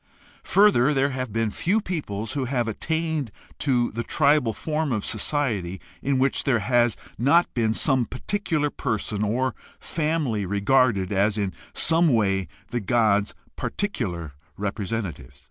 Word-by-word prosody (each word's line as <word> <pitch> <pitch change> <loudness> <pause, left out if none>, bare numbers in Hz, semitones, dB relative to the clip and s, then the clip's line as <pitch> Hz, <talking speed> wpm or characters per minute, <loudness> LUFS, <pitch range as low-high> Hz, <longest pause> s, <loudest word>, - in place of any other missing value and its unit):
Further, 150 -9 +4
there 135 +1 +2
have 130 -3 -4
been 115 0 0
few 190 - +1
peoples 115 - -4
who 140 -3 -1
have 120 -2 -1
attained 160 +2 -2 0.3
to 125 -4 +1
the 115 - -3
tribal 140 -1 +2
form 155 +5 -2
of 110 -4 -1
society 105 - -1 0.2
in 135 -1 +1
which 135 +1 +2
there 135 -4 +2
has 120 +2 +2 0.2
not 155 +8 +3
been 110 -2 +1
some 130 -3 +3
particular 155 0 -1
person 105 -1 -2
or 125 +4 0 0.3
family 150 -9 -1
regarded 100 0 +2
as 100 +2 +2
in 100 -3 -1 0.2
some 165 +1 +4
way 100 - +2 0.2
the 120 - 0
god's 105 -1 +2 0.2
particular 85 - -3 0.2
repre 100 0 -3
sentative. 85 - -4
120 Hz, 140 wpm, -24 LUFS, 105-145 Hz, 0.3 s, Further